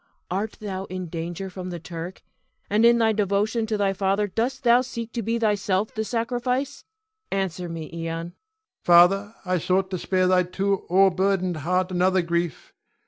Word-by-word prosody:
Art 205 Hz, +4 st, -2 dB
thou 195 Hz, -2 st, -5 dB
in 185 Hz, -2 st, -6 dB
danger 170 Hz, +3 st, -5 dB
from 185 Hz, 0 st, -7 dB
the 175 Hz, -, -5 dB
Turk, 170 Hz, +2 st, -8 dB, 0.5 s
and 215 Hz, +3 st, +4 dB
in 235 Hz, 0 st, +5 dB
thy 225 Hz, -1 st, +3 dB
devotion 210 Hz, +2 st, 0 dB
to 215 Hz, -1 st, -1 dB
thy 200 Hz, -1 st, +1 dB
father 195 Hz, +2 st, +1 dB
dost 235 Hz, +7 st, -2 dB
thou 240 Hz, 0 st, +5 dB
seek 235 Hz, -3 st, -6 dB
to 235 Hz, -, -2 dB
be 230 Hz, +2 st, -1 dB
thyself 205 Hz, -2 st, 0 dB
the 220 Hz, -, -2 dB
sacrifice? 250 Hz, +5 st, -2 dB, 0.5 s
Answer 185 Hz, -2 st, -2 dB
me, 165 Hz, -1 st, -5 dB
Ion. 170 Hz, -, -6 dB, 0.2 s
Ion. 170 Hz, +1 st, -7 dB, 0.5 s
Father, 195 Hz, +5 st, +5 dB
I 180 Hz, -1 st, +1 dB
sought 185 Hz, +3 st, 0 dB
to 185 Hz, -, -2 dB
spare 185 Hz, +1 st, +1 dB
thy 185 Hz, 0 st, +4 dB
too 195 Hz, +2 st, -1 dB
o'erburdened 190 Hz, -1 st, +3 dB
heart 180 Hz, +4 st, 0 dB
another 185 Hz, 0 st, +2 dB
grief. 170 Hz, -3 st, -2 dB
195 Hz, 170 wpm, -24 LUFS, 180-220 Hz, 0.5 s, in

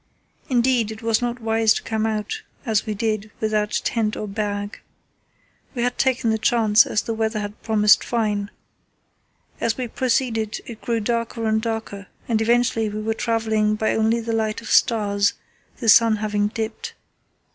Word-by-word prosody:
Indeed 245 Hz, -3 st, +2 dB
it 220 Hz, +1 st, -8 dB
was 225 Hz, 0 st, +1 dB
not 240 Hz, 0 st, -2 dB
wise 225 Hz, -1 st, +2 dB
to -, -, -4 dB
come 220 Hz, -1 st, -1 dB
out 215 Hz, -2 st, -3 dB, 0.2 s
as 220 Hz, -3 st, 0 dB
we 215 Hz, -, -2 dB
did 215 Hz, 0 st, -2 dB
without 215 Hz, -1 st, 0 dB
tent 220 Hz, -2 st, -1 dB
or 215 Hz, -, -4 dB
bag. 205 Hz, 0 st, -4 dB, 1.0 s
We 240 Hz, -, -1 dB
had 245 Hz, 0 st, -1 dB
taken 250 Hz, -4 st, +2 dB
the 220 Hz, -, 0 dB
chance, 225 Hz, -1 st, +4 dB
as 210 Hz, -, 0 dB
the 230 Hz, -, -3 dB
weather 220 Hz, 0 st, -1 dB
had 205 Hz, 0 st, -6 dB
promised 210 Hz, -2 st, +4 dB
fine. 210 Hz, -4 st, -1 dB, 1.1 s
As 230 Hz, -1 st, 0 dB
we 255 Hz, -2 st, -3 dB
proceeded 230 Hz, -3 st, -1 dB
it 230 Hz, -2 st, -10 dB
grew 230 Hz, -1 st, -1 dB
darker 230 Hz, +1 st, -2 dB
and 220 Hz, 0 st, +1 dB
darker, 220 Hz, -3 st, -4 dB, 0.2 s
and 225 Hz, -2 st, +1 dB
eventually 230 Hz, -1 st, +2 dB
we 210 Hz, +1 st, -5 dB
were 220 Hz, +1 st, -1 dB
travelling 220 Hz, -2 st, 0 dB
by 220 Hz, +1 st, 0 dB
only 220 Hz, +1 st, +2 dB
the 230 Hz, 0 st, -3 dB
light 220 Hz, -1 st, -1 dB
of 230 Hz, -, -8 dB
stars, 205 Hz, -2 st, +3 dB, 0.4 s
the 235 Hz, -, -5 dB
sun 225 Hz, 0 st, +6 dB
having 210 Hz, -1 st, 0 dB
dipped. 220 Hz, +1 st, -5 dB
220 Hz, 170 wpm, -22 LUFS, 215-230 Hz, 1.1 s, sun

